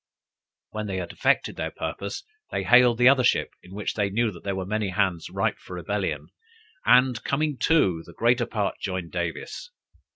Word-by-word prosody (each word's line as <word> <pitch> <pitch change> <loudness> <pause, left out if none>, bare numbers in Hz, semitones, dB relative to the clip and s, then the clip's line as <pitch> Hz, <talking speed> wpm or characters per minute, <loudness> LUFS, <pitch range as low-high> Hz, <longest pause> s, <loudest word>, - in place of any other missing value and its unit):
When 110 0 -4
they 95 -2 -3
had 90 -2 -4
effected - - +1
their - - -2
purpose, 100 0 -5 0.3
they - - -1
hailed 125 -1 +6
the 125 +1 +5
other 130 -1 +6
ship, 125 - +2
in 90 +2 -13
which 105 - -3
they 105 -2 0
knew 115 +2 +1
that 85 - -13
there 100 -1 -2
were 95 -1 -3
many 105 0 -1
hands 95 -2 -1
ripe - - -1
for - - -9
rebellion, - - -3 0.6
and 125 -2 +4
coming 150 +1 0
to, 95 - +3
the 85 - -14
greater 120 +1 +2
part 105 -3 -2
joined 90 -3 -4
Davis. 85 - -4
105 Hz, 185 wpm, -25 LUFS, 95-125 Hz, 0.6 s, hailed